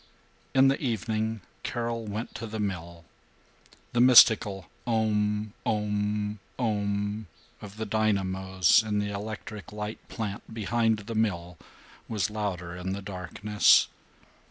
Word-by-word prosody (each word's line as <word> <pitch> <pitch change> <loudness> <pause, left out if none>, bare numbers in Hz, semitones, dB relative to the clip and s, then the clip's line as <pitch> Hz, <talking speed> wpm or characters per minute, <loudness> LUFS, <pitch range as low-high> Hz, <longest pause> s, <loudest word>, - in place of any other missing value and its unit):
In 135 0 +7
the 135 - +1
evening 110 -3 -1 0.2
Carol 115 -1 -3
went 105 +3 -4
to 115 - -6
the 110 0 -5
mill. 85 -4 -4 0.9
The 120 - +3
mystical 110 -6 +7 0.2
Om 105 -2 +1
Om 105 0 -1 0.2
Om 105 -2 -1 0.3
of 105 0 -10
the 110 - -3
dynamos 95 -3 +2
in 105 -1 -2
the 105 0 0
electric 105 +1 -6
light 105 +1 -5
plant 105 0 -5
behind 110 +1 +1
the 110 +3 -6
mill 90 -6 -1 0.5
was 105 -2 -1
louder 90 -5 -3
in 90 +1 -4
the 100 0 -5
darkness. 100 +2 +3
105 Hz, 120 wpm, -28 LUFS, 100-110 Hz, 0.9 s, In